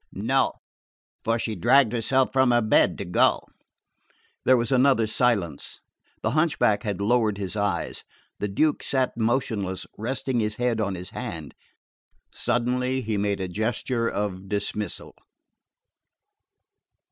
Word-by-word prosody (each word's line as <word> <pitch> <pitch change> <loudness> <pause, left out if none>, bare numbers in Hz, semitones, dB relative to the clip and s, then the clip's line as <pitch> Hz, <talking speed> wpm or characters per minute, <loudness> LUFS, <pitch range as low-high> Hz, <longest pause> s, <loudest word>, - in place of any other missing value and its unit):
"No; - - +1 0.7
for 115 +1 +1
she 115 -1 -2
dragged 120 +5 +4
herself 130 +3 +1
from 130 -1 +4
her 120 -1 +3
bed 110 -4 +3
to 100 - -4
go." 90 - +3 1.1
There 130 - +6
was 120 +2 0
another 130 -3 +4
silence. 105 - -1 0.4
The 110 - +1
hunchback 155 -8 +2
had 105 -6 -3
lowered 110 0 +2
his 100 -1 -5
eyes. 100 -4 -2 0.4
The 105 - -1
Duke 150 +10 +1
sat 130 -2 0
motionless, 110 -5 -1
resting 130 +2 -1
his 105 -1 -1
head 120 -2 0
on 100 -2 -1
his 90 0 -8
hand. 85 - -6 0.8
Suddenly 125 +2 0
he 110 -3 -2
made 100 0 0
a 95 - -2
gesture 115 +4 -1
of 95 -2 -4
dismissal... 105 0 -3
110 Hz, 130 wpm, -25 LUFS, 100-125 Hz, 1.1 s, There